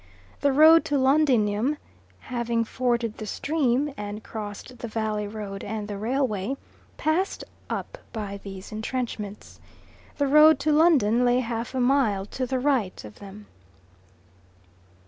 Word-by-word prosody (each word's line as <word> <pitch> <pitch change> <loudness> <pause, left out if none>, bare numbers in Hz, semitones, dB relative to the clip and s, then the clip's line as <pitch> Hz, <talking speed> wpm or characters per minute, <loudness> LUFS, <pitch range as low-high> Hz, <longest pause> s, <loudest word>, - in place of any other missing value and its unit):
The 285 - +2
road 315 +4 +7
to 290 - 0
Londinium, 265 -3 +2 0.4
having 235 -2 -1
forded 235 -1 -1
the 215 - -5
stream 280 +1 0
and 210 +1 -6
crossed 215 +3 -8
the 235 - -5
valley 215 -2 -2
road 205 -2 -6
and 210 0 -4
the 205 - -5
railway, 230 0 -1 0.4
passed 335 +6 0 0.3
up - - -5
by 200 -3 -5
these 195 -1 -9
entrenchments. 215 -2 -5 0.6
The 285 - +2
road 300 +2 +7
to 305 +2 +2
London 285 -8 +4
lay 245 +1 +3
half 230 +1 -4
a - - 0
mile 245 -7 +2
to 255 -1 -2
the 260 +1 -1
right 250 - 0
of 105 - -12
them. 200 +1 -11
235 Hz, 135 wpm, -25 LUFS, 210-275 Hz, 0.6 s, road